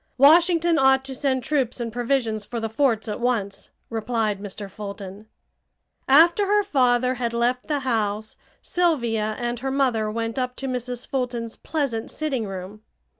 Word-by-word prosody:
Washington 335 +3 +5
ought 265 0 +4
to 270 - -5
send 260 -1 0
troops 265 -4 0
and 230 -2 -4
provisions 240 -3 0
for 235 +3 -5
the 225 -1 -3
forts 230 -3 +1
at 210 - -3
once!" 215 -5 -2 0.2
replied 220 -2 -1
Mr. 205 0 -7
Fulton. 200 +1 -8 0.8
After 340 +8 +5
her 415 +1 +3
father 255 -7 +2
had 240 -2 -3
left 245 +2 0
the 295 -2 -1
house 220 -4 -1 0.3
Sylvia 235 -11 0
and 240 -1 -3
her 270 +2 -3
mother 255 -6 +1
went 225 +3 -3
up 250 0 -2
to 270 - -5
Mrs. 250 -1 -4
Fulton's 245 -4 -3
pleasant 275 -8 -3
sitting 270 -8 -2
room. 195 +2 -7
245 Hz, 155 wpm, -24 LUFS, 220-270 Hz, 0.8 s, Washington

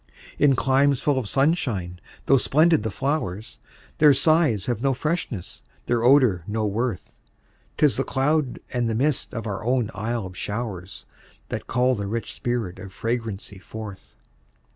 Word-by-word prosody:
In 140 -2 +5
climes 135 +1 +3
full 145 -3 +1
of 110 -6 -5
sunshine, 120 - 0 0.3
tho' 135 - +5
splendid 155 +3 +4
the 110 - -2
flowers, 115 - -3 0.4
Their 150 -2 +7
sighs 145 - +3
have 120 -3 -2
no 135 0 +1
freshness, 145 - -3 0.2
their 120 -1 0
odor 125 - +5
no 110 +1 -1
worth; 110 -1 -3 0.6
'Tis 145 -8 +3
the 135 - +1
cloud 140 0 0 0.2
and 120 -2 0
the 110 - -1
mist 140 +4 0
of 115 -1 -5
our 105 0 -4
own 120 -2 +1
Isle 110 +1 -3
of 90 -1 -9
showers, 100 -3 -5 0.4
That - - -5
call 125 +1 +2
the 100 -4 -3
rich 115 +3 -4
spirit 120 -7 -3
of 100 - -9
fragrancy 110 -3 -4
forth. 100 - -9
120 Hz, 155 wpm, -24 LUFS, 105-135 Hz, 0.6 s, Their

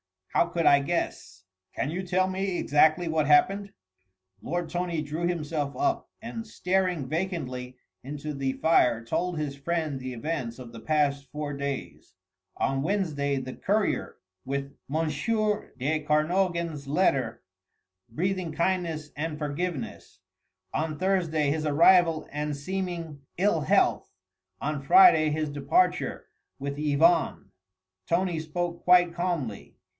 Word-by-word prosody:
How - - +3
could 170 -1 -1
I 140 - +7
guess?" 140 - -3 0.3
"Can 145 - -1
you 180 +3 -2
tell 185 +1 +1
me 190 -1 -2
exactly 155 +4 +3
what 160 -2 +1
happened?" 195 +7 +3 0.7
Lord 175 0 -3
Tony 175 -2 -2
drew 155 +4 -2
himself 150 -4 -2
up, 350 -1 0
and 225 0 -6
staring 180 -6 0
vacantly 130 -7 -3 0.2
into 150 +3 -6
the 135 -1 -1
fire 125 -8 +3
told 175 +9 -1
his 145 -2 -3
friend 155 -1 -2
the 130 0 -5
events 125 -2 -3
of 125 -3 -10
the 115 - -9
past 140 0 0
four 150 -1 -4
days. 140 -1 -5 0.4
On 135 0 0
Wednesday 155 -6 0
the 130 -1 -5
courier 205 +1 0 0.3
with 140 +1 -3 0.2
M. 160 +2 +1 0.7
de 145 +5 0
Kernogan's 160 0 0
letter, 135 -7 +1 0.7
breathing 180 +5 -2
kindness 170 -3 -1
and 155 +1 -3
forgiveness. 150 - -4 0.5
On 155 -1 -2
Thursday 165 -6 +1
his 155 +1 -1
arrival 165 +1 +4
and 150 0 -2
seeming 170 -1 -4 0.2
ill 190 -2 +2
health, 145 - +2 0.5
on 150 -1 -2
Friday 360 - +7
his 155 0 -1
departure 150 +6 +1 0.3
with 140 +1 -5
Yvonne. 155 +3 +2 0.6
Tony 175 -1 +1
spoke 170 +2 -4
quite 180 -1 +6
calmly. 170 - -3
155 Hz, 125 wpm, -27 LUFS, 140-175 Hz, 0.7 s, I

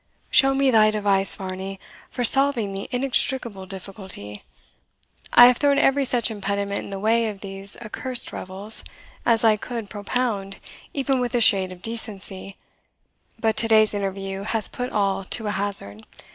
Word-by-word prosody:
Show 270 +1 +5
me 270 -1 +3
thy 215 -2 +5
device, 200 -2 +4
Varney, 190 0 -6 0.3
for 250 - -3
solving 245 -5 +2
the 195 +1 -6
inextricable 245 -5 -1
difficulty. 190 - -7 0.9
I 240 - +9
have 245 -1 +5
thrown 285 -1 +2
every 275 -1 +3
such 240 -2 +1
impediment 200 -1 -3
in - - -9
the 195 - -5
way 225 +3 +2
of 205 -2 -9
these 195 0 -6
accursed 245 +2 -4
revels 195 +4 -2 0.4
as 230 -1 +3
I 220 -2 +5
could 230 -1 -6
propound 205 -2 -3 0.3
even 270 -1 0
with 245 -1 -2
a - - +3
shade 195 -5 +4
of 180 -1 -12
decency, 200 -4 -4 0.8
but 220 -2 0
to 225 - +3
day's 215 -1 +4
interview 195 -1 -4
has 220 +1 -1
put 250 0 -5
all 195 -2 0
to 220 +3 -2
a 210 - -1
hazard. 190 - -4
210 Hz, 160 wpm, -23 LUFS, 195-240 Hz, 0.9 s, I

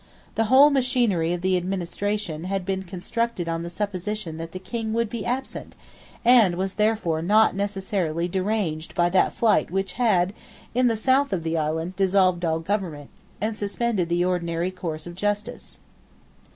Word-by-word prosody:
The 225 - +1
whole 270 +6 +7
machinery 245 -11 +1
of 175 -1 -2
the 185 0 +2
administration 185 -1 -3
had 195 -1 -2
been 190 0 -1
constructed 190 +2 -3
on 165 0 -2
the 170 - -5
supposition 200 -2 -4
that 165 0 -6
the 185 - -6
King 220 +4 -4
would 230 -1 0
be 230 -3 -4
absent, 260 +2 -4 0.5
and 230 -7 +6
was 190 +2 -2
therefore 210 -7 +1
not 210 +4 +4
necessarily 195 -4 -1
deranged 185 -4 -2
by 175 0 +2
that 190 - +3
flight 220 -3 +3
which 195 +1 -2
had, 190 -5 +3 0.4
in 250 +1 +3
the 225 -2 +1
south 265 +4 +2
of 180 -4 -1
the 165 0 -1
island, 160 +3 -1
dissolved 185 -2 +3
all 160 -1 +1
government, 165 -5 -3 0.3
and 215 +1 -1
suspended 205 -3 -1
the 175 +1 +2
ordinary 175 0 -1
course 165 -4 -5
of 175 - -7
justice. 205 +3 -3
190 Hz, 165 wpm, -24 LUFS, 175-215 Hz, 0.5 s, whole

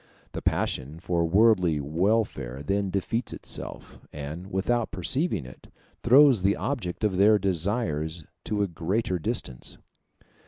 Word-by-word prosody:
The - - -5
passion 70 +5 -1
for 85 -1 0
worldly 90 -3 +4
welfare 80 - 0
then 100 +4 0
defeats 110 +5 -1
itself, - - -7
and, 75 +5 -6
without 115 +5 0
perceiving 100 - -1
it, 65 - -13 0.3
throws 130 -2 +6
the 100 +2 +3
object 110 -10 -3
of 100 -4 +1
their 105 +2 +6
desires 85 -4 -1 0.2
to 105 -1 0
a - - 0
greater 95 +3 -1
distance. 65 -5 -3
95 Hz, 125 wpm, -27 LUFS, 80-110 Hz, 0.3 s, throws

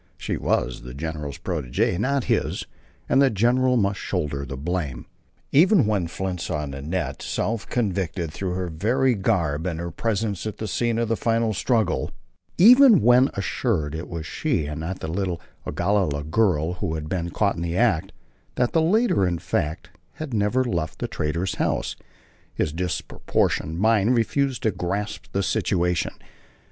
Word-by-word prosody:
She - - -3
was 65 0 -1
the - - -9
general's 75 -1 -4
protegée, 65 +7 -1
not 135 +4 +1
his, - - 0 0.4
and 135 - +4
the 135 - +5
general 125 +4 +2
must 100 -2 +1
shoulder 70 -6 -2
the 70 - -6
blame. 75 -4 -3 0.5
Even 175 - +5
when 100 -5 0
Flint 90 0 -4
saw 75 0 -2
Nanette, 70 +6 -4
self 115 -1 -2
convicted 95 -7 -1
through 95 -2 -3
her 90 0 -2
very 120 +11 +1
garb 90 -7 0
and 85 -3 -3
her 85 0 -4
presence 105 +1 -2
at 105 - -5
the 110 - -4
scene 115 +3 0
of 115 0 0
the 115 - +1
final 115 -1 +1
struggle, 110 0 +1 0.5
even 240 - +8
when 125 +3 +6
assured 95 - -1
it 80 +2 -5
was 85 -2 -5
she 125 - -1
and 75 +1 -5
not 90 +4 -4
the - - -3
little 90 0 -2 0.3
Ogalalla 85 -3 0
girl 85 -1 +1
who 85 -6 -1
had 75 -1 -5
been 85 0 -2
caught 100 +3 +1
in 85 - -5
the 85 +1 -2
act, 105 -10 +2 0.4
that 125 -1 +1
the 165 - +3
latter, 180 - +3
in 85 -1 -1
fact, 75 0 -2 0.2
had 155 -5 -6
never 105 +4 +2
left 85 -10 -2
the - - -3
trader's 85 +5 -2
house, - - 0 0.6
his 75 - -1
disproportioned 80 -2 -1
mind 110 +3 +3
refused 130 +3 0
to 110 - +3
grasp 95 +3 -3
the 100 - 0
situation. 90 -2 0
95 Hz, 165 wpm, -24 LUFS, 80-115 Hz, 0.6 s, even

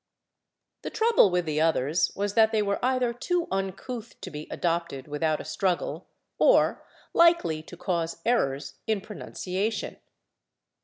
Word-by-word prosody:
The - - -4
trouble 450 - +4
with 180 -1 0
the 155 -1 0
others 160 0 +2
was 205 0 -1
that 220 0 +5
they 215 -1 +2
were 200 +2 -2
either 255 -1 +1
too 345 +8 -1
uncouth 195 +5 -4
to - - -7
be 150 0 -7
adopted 170 -6 -2
without 150 +1 0
a - - -7
struggle 175 +3 -1 0.3
or - - +4 0.3
likely 330 - +4
to 170 +2 -12
cause 170 -2 -2
errors 140 - 0
in 215 -3 +1
pronunciation. 205 0 -4
185 Hz, 140 wpm, -27 LUFS, 160-225 Hz, 0.3 s, that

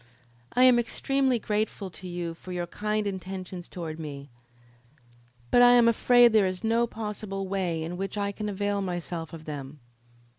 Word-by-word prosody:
"I 250 - +4
am 250 -2 +7
extremely 265 +2 +1
grateful 210 -3 -2
to 185 - -10
you 175 -1 -4
for 180 +2 -11
your 175 -1 -2
kind 210 +4 -2
intentions 185 -2 -5
toward 165 -3 -6
me, 140 -3 -7 1.2
but 245 - +6
I 245 0 +8
am 240 -1 +6
afraid 240 0 +5
there 210 -3 +5
is 185 +2 -4
no 230 +1 +2
possible 210 -3 -5
way 180 -4 -1
in 170 +2 -5
which 195 +2 -4
I 200 0 0
can 210 +1 -4
avail 205 0 -1
myself 175 -3 -4
of 160 -1 -10
them." 145 -1 -7
195 Hz, 170 wpm, -27 LUFS, 175-220 Hz, 1.2 s, I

